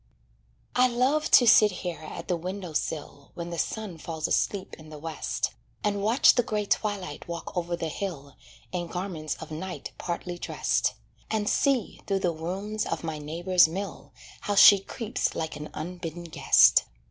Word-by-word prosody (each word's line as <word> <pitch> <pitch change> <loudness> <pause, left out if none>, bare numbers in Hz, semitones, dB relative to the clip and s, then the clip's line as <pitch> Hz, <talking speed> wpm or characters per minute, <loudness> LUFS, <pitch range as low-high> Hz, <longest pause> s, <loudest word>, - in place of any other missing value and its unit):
I 250 0 +5
love 260 +6 +1
to 245 - +7
sit 220 -2 +7 0.2
here 175 -2 -3
at 155 - -8
the 180 - +1
window 180 0 -5
sill 145 -2 -4
When 170 0 -5
the 170 - -4
sun 205 -5 -3
falls 160 -1 -3
asleep 195 -2 0
in 155 0 -13
the 155 - -9
West, 160 +1 -3 0.3
And 205 -1 0
watch 225 +6 +5
the 245 - +3
gray 210 -3 -2
Twilight 200 -7 -2
walk 170 -1 -6
over 175 -1 -1
the 165 -1 -3
hill 150 -6 -5 0.4
In 175 -1 -3
garments 175 -3 -4
of - - -10
night 180 +4 -6
partly 175 0 -4
dressed, - - 0 0.3
And 215 -1 -1
see, 265 -3 +1
through 195 -1 0
the 175 -2 +1
rooms 195 +7 -3
of - - -3
my 160 -2 -4
neighbor's 175 +4 +3
mill, 195 +5 -6 0.3
How 205 - -2
she 200 0 +9
creeps 220 +3 -3
like 160 -1 -3
an 150 +1 -7
unbidden 175 0 -6
guest. 165 - +5
180 Hz, 170 wpm, -27 LUFS, 160-205 Hz, 0.4 s, she